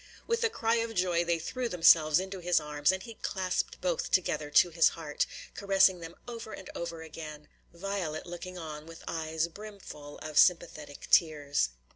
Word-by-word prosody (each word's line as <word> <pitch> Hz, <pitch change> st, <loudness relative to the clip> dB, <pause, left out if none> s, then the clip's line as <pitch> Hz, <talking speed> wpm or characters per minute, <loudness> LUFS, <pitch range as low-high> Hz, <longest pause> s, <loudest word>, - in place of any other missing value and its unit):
With 465 Hz, 0 st, 0 dB
a 460 Hz, -, +3 dB
cry 230 Hz, -, +1 dB
of 230 Hz, 0 st, -2 dB
joy 180 Hz, -2 st, +2 dB
they 170 Hz, -1 st, +1 dB
threw 240 Hz, +9 st, -3 dB
themselves 165 Hz, -4 st, +5 dB
into 190 Hz, 0 st, -5 dB
his 175 Hz, -1 st, +2 dB
arms, 150 Hz, +1 st, +1 dB
and 190 Hz, 0 st, -4 dB
he 230 Hz, -2 st, -11 dB
clasped 185 Hz, -2 st, -2 dB
both 180 Hz, -3 st, -1 dB
together 155 Hz, -5 st, +1 dB
to 170 Hz, +4 st, +5 dB
his 165 Hz, 0 st, +5 dB
heart, 150 Hz, -3 st, -2 dB, 0.3 s
caressing 195 Hz, -2 st, +3 dB
them 165 Hz, 0 st, -9 dB
over 230 Hz, -2 st, -7 dB
and 190 Hz, -, -9 dB
over 170 Hz, -1 st, -5 dB
again, 155 Hz, -1 st, -9 dB, 0.2 s
Violet 175 Hz, -3 st, -4 dB
looking 180 Hz, +1 st, -7 dB
on 155 Hz, -2 st, -7 dB
with 165 Hz, 0 st, -11 dB
eyes 160 Hz, 0 st, -1 dB
brimful 185 Hz, -7 st, -10 dB
of 155 Hz, -1 st, +1 dB
sympathetic 155 Hz, -5 st, +2 dB
tears. 145 Hz, -, +3 dB
170 Hz, 170 wpm, -30 LUFS, 155-190 Hz, 0.3 s, themselves